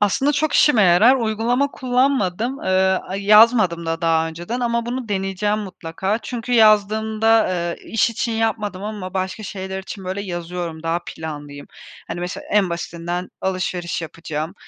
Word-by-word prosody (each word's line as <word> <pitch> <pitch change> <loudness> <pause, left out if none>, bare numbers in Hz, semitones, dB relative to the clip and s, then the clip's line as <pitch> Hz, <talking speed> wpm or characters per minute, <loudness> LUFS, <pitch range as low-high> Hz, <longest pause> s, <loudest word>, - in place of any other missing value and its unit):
Aslında, 265 +8 +2
çok 295 +1 0
işime 245 -8 +5
yarar. 195 +8 +6
Uygulama 240 +4 0
kullanmadım. 250 -3 0
Eee, - - -2 0.4
a 190 - -3
yazmadım 200 -4 +5
da 165 0 -2
daha 165 -1 +2
önceden 175 +10 -5
ama 235 -1 0
bunu 245 -1 -4
deneyeceğim 200 +1 -1
mutlaka. 190 +1 -3
Çünkü 245 0 -5
yazdığımda, 220 0 +4
ııı, 175 -1 -2
iş 225 +1 0
için 230 +1 -2
yapmadım 215 -4 -1
ama 205 -3 -6
başka 190 +3 -3
şeyler 190 -1 -5
için, 190 0 -8
böyle, 190 +2 -3
yazıyorum, 175 -3 -5
daha 165 +1 -1
planlıyım. 145 -2 -7 0.4
Hani, 170 +1 -4
mesela, 180 0 -5
en 200 -3 +3
basitinden 170 +1 -4
alışveriş 185 -2 -2
yapacağım, 160 +1 -5
195 Hz, 145 wpm, -21 LUFS, 175-225 Hz, 0.4 s, yarar